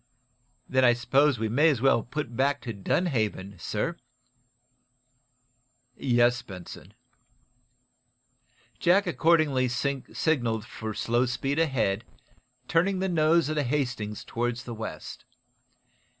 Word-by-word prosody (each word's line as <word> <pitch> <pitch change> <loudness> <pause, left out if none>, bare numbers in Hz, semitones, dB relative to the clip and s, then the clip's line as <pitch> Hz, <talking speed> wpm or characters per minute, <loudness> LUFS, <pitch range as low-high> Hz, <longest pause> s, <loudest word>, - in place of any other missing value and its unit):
"Then 130 0 +2
I 120 -1 +6
suppose 135 +3 +2
we 110 0 -1
may 145 +9 +4
as 140 -6 +1
well 135 -2 +3
put 125 0 -5
back 140 +2 +1
to 115 - -5
Dunhaven, 105 - -1
sir?" 165 - -2 2.0
"Yes, 120 -1 +2
Benson." 95 -2 -11 1.8
Jack 185 +4 +4
accordingly 155 -5 +2
signaled 125 -2 -1
for 110 -1 -6
slow 120 +2 +1
speed 135 +4 -1
ahead, 120 -9 +1 0.6
turning 185 +4 +2
the 190 +1 -1
nose 165 -1 +3
of 155 - -2
the 150 - +1
"Hastings" 125 -6 -2
toward 120 +1 -2
the 120 0 -7
west. 110 -9 -7
125 Hz, 110 wpm, -27 LUFS, 115-150 Hz, 2.0 s, I